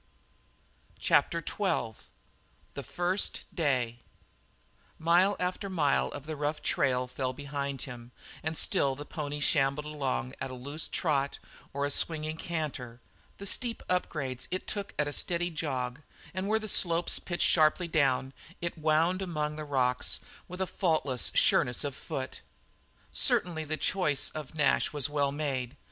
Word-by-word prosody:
CHAPTER 170 -1 +3
XII 185 - 0 0.8
THE - - -4
FIRST 180 +3 0
DAY 125 -8 +1 1.0
Mile 175 +5 +4
after 185 +2 -2
mile 155 -7 +2
of 145 -1 -7
the 155 0 -4
rough 150 +1 -2
trail 125 -1 +2
fell 130 +1 -2
behind 140 -1 -4
him, 120 -2 -9 0.3
and 155 +1 -2
still 135 -1 +2
the 145 +2 -7
pony 150 -3 -4
shambled 145 0 +2
along 135 - -2
at - - -2
a 130 - -6
loose 140 +5 -4
trot 140 -5 0 0.3
or 140 +1 -1
a 145 - -1
swinging 155 0 +1
canter; 145 -9 -4 0.4
the 200 - -7
steep 230 +3 0
upgrades 140 -8 -1
it 185 - -3
took 200 -1 -3
at 150 - +2
a 145 - -3
steady 175 +2 +1
jog 135 -4 -3 0.3
and 185 +2 -2
where 220 +1 +3
the 215 0 -4
slopes 170 -3 +2
pitched 175 -1 0
sharply 160 +2 +4
down, 135 -4 +2 0.3
it 170 -1 -3
wound 160 +4 +3
among 150 -5 -2
the 155 0 -5
rocks 125 -3 +1 0.3
with 180 +1 -6
a - - +3
faultless 155 -9 +1
sureness 125 -1 +4
of 145 -2 -2
foot. 130 -1 -5 0.7
Certainly 160 -3 +2
the 155 +1 -2
choice 150 -8 +1
of 155 0 -7
Nash 150 -2 +3
was 145 -1 +1
well 140 -2 +1
made. 135 -4 -2
150 Hz, 150 wpm, -30 LUFS, 135-170 Hz, 1.0 s, Mile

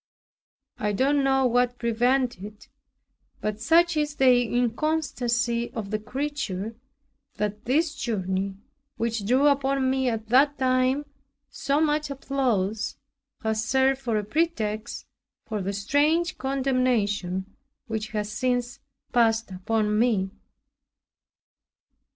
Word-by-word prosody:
I 210 0 0
don't 275 +6 +2
know 270 -1 +3
what 245 0 +2
prevented 240 -2 +1
it; 210 +1 -11 0.7
but 215 0 -3
such 335 +6 +4
is 300 -1 -1
the 255 -3 +5
inconstancy 245 -2 0
of 210 -3 -5
the 215 - 0
creature, 230 -4 -4 0.6
that 210 +1 -3
this 300 +6 +1
journey, 195 -5 -2 0.4
which 230 -3 -2
drew 260 +5 +3
upon 275 -2 +2
me 265 -1 +1
at 220 -2 -4
that 280 +4 +4
time 255 +2 +2 0.5
so 280 +1 0
much 300 -1 +1
applause, 245 -7 -1 0.5
has 220 0 0
served 265 +2 +2
for 235 -4 0
a 210 - -1
pretext 220 -5 -2 0.4
for 215 -2 -3
the 195 +1 -2
strange 295 - +1
condemnation 240 -8 0 0.3
which 220 -2 -3
has 210 -1 -3
since 245 +2 -1 0.3
passed 225 -3 +2
upon 210 +3 0
me. 210 -5 +2
245 Hz, 115 wpm, -26 LUFS, 215-270 Hz, 0.7 s, the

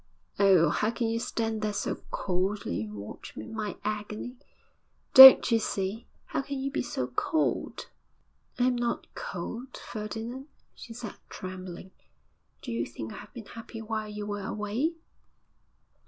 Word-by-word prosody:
'Oh! 190 -4 +6
how 215 - +1
can 230 0 -1
you 230 0 0
stand 225 -1 -2
there 210 -1 -1
so - - -2
coldly 185 - -1
and 105 0 -9
watch 100 0 -9
my 215 -3 -5
agony? 215 +3 -4 0.8
Don't 265 -2 +12
you 230 - +5
see? 200 +1 -3 0.2
How - - -2
can 280 +1 -5
you 275 +1 -2
be 285 - -1
so 130 - -2
cold?' 130 - -1 0.7
'I 245 - +2
am 255 -1 +3
not 240 0 -1
cold, 235 +8 -6
Ferdinand,' 230 +5 -6 0.3
she 235 - -11
said, 230 -2 -7
trembling. 185 0 -8 0.7
'Do - - -5
you 115 0 -1
think 115 -2 -7
I - - -9
have 205 - -12
been 230 -3 -8
happy 225 +1 -9
while 215 -1 -3
you 210 0 -5
were 205 0 -4
away?' 215 - -2
215 Hz, 150 wpm, -29 LUFS, 190-235 Hz, 0.8 s, Don't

